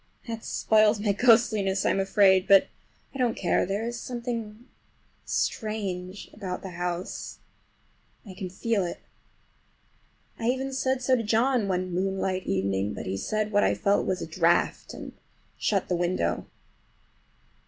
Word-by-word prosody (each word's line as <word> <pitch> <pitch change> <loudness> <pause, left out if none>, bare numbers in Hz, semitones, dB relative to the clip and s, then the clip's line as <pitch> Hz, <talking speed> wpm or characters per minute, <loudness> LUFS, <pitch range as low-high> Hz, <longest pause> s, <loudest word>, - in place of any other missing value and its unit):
That 225 -1 -5
spoils 215 -1 +3
my 205 0 +1
ghostliness, 215 -3 +3
I - - +4
am - - 0
afraid; 195 -1 +4
but 195 -1 +6 0.4
I 270 - -8
don't 245 -3 +1
care—there 195 +4 0
is 235 0 -4
something 235 -2 -5 0.6
strange 200 -4 -3
about 190 -4 -5
the 190 - -6
house—I 180 +3 -8
can 185 0 -6
feel 205 +2 0
it. 175 - -5 1.4
I 225 - -3
even 265 +2 -1
said 260 -1 0
so 255 +1 +4
to 240 - 0
John 230 +1 +2
one 185 -1 -1
moonlight 190 0 -1
evening, 95 +1 0
but - - -6
he 95 - -2
said 215 - -2
what 205 0 +3
I - - +2
felt 200 0 +1
was 185 - -1
a - - -3
draught, 170 +1 +1
and - - -8 0.4
shut 200 -3 0
the 180 - 0
window. 175 - -1
200 Hz, 145 wpm, -27 LUFS, 185-225 Hz, 1.4 s, but